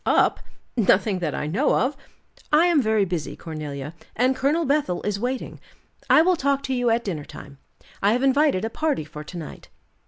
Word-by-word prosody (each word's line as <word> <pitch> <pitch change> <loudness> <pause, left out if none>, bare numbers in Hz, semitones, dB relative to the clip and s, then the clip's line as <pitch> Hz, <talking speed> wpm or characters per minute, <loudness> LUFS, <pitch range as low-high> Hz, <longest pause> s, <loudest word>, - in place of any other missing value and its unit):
"Up! - - +3 0.4
Nothing 205 -3 +2
that 160 -4 -2
I - - -3
know 200 - +1
of. 270 +3 +1 0.6
I 305 +3 +5
am 340 -5 +4
very 215 -3 +2
busy, 175 -4 -4
Cornelia, 150 -2 -6 0.2
and 255 +3 +2
Colonel 295 +6 +1
Bethel 275 -10 0
is 205 -1 -2
waiting; 250 +3 -3 0.5
I 315 - +7
will 365 +1 +3
talk 280 -3 0
to 265 - -2
you 245 -1 +1
at 230 +1 +1
dinner 170 -8 -4
time. 140 -1 -12 0.4
I 200 +2 +3
have 250 +2 0
invited 275 -7 +3
a 225 - -4
party 305 - -1
for 150 0 -9
to 175 +4 -9
night." 160 -3 -9
225 Hz, 190 wpm, -24 LUFS, 170-275 Hz, 0.6 s, I